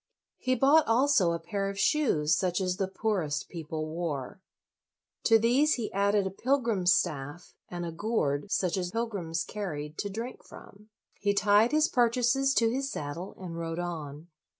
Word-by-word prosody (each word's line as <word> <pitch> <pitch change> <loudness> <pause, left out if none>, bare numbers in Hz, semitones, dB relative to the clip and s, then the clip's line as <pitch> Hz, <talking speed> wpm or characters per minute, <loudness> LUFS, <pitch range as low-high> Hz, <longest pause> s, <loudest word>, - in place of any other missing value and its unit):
He 255 0 +1
bought 280 +4 +4
also 230 -6 +3
a 170 - -1
pair 195 +4 -3
of 200 - -6
shoes 165 - +2
such 180 +1 0
as 185 -1 -1
the 195 - -1
poorest 185 -7 -2
people 160 -2 -5
wore. 155 -2 -4 0.8
To 225 - +6
these 250 +7 +3
he 230 -4 -4
added 200 0 +2
a 190 - -2
pilgrim's 230 -5 +1
staff, 150 0 -1 0.2
and 175 -1 -5
a 170 - -4
gourd 165 -3 -1
such 185 0 0
as 180 -1 -2
pilgrims 195 -7 -2
carried 155 -7 -6
to 205 - -2
drink 230 +5 -6
from. 210 +2 -15 0.3
He 205 0 +1
tied 205 +3 +4
his 310 +1 +3
purchases 250 +3 +2
to 225 -1 +3
his 270 +2 -2
saddle, 150 +6 -6
and 170 -3 -7
rode 165 0 -4
on. 160 -2 -6
195 Hz, 165 wpm, -29 LUFS, 165-230 Hz, 0.8 s, To